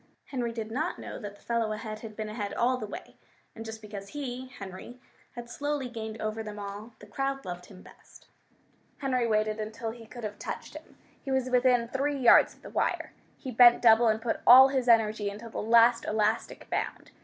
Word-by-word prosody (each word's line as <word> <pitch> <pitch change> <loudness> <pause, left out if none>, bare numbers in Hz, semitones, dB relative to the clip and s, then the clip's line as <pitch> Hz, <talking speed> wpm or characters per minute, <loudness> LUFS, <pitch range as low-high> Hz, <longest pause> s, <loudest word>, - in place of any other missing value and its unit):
Henry 245 -4 -3
did 225 -1 -6
not 310 +9 -2
know - - -8
that 205 -1 -8
the - - -22
fellow 230 -2 -1
ahead 215 0 -6
had 220 -1 -9
been 215 0 -4
ahead 215 -1 -5
all 250 +2 +2
the 225 -4 -5
way, - - -10 0.4
and 225 - -7
just 220 -1 -8
because 205 -2 -8
he 260 -1 -6
Henry 205 +1 -10 0.4
had 240 0 -7
slowly 290 +1 -3
gained 220 -2 -7
over 215 +1 -3
them 210 -1 -7
all, 205 +3 -8
the - - -14
crowd 270 +6 -3
loved 180 -1 -7
him 190 -2 -14
best. - - -18 0.7
Henry 255 -4 0
waited 215 0 0
until 220 +1 -4
he 230 -1 -12
could 240 +1 -10
have 205 -1 -5
touched - - -6
him. - - -12 0.3
He 275 - -7
was 260 -1 0
within 250 -1 +3
three 280 +4 -1
yards 245 -3 +6
of - - -27
the - - -10
wire. - - -1 0.2
He 260 - -7
bent 240 +1 +6
double, 230 0 +6
and 220 0 +2
put 225 0 -2
all 260 +2 +10
his 260 -2 -1
energy 215 -3 +3
into 210 +3 -9
the - - -5
last 230 +2 +5
elastic 215 +1 -1
bound. - - -3
230 Hz, 205 wpm, -28 LUFS, 215-250 Hz, 0.7 s, all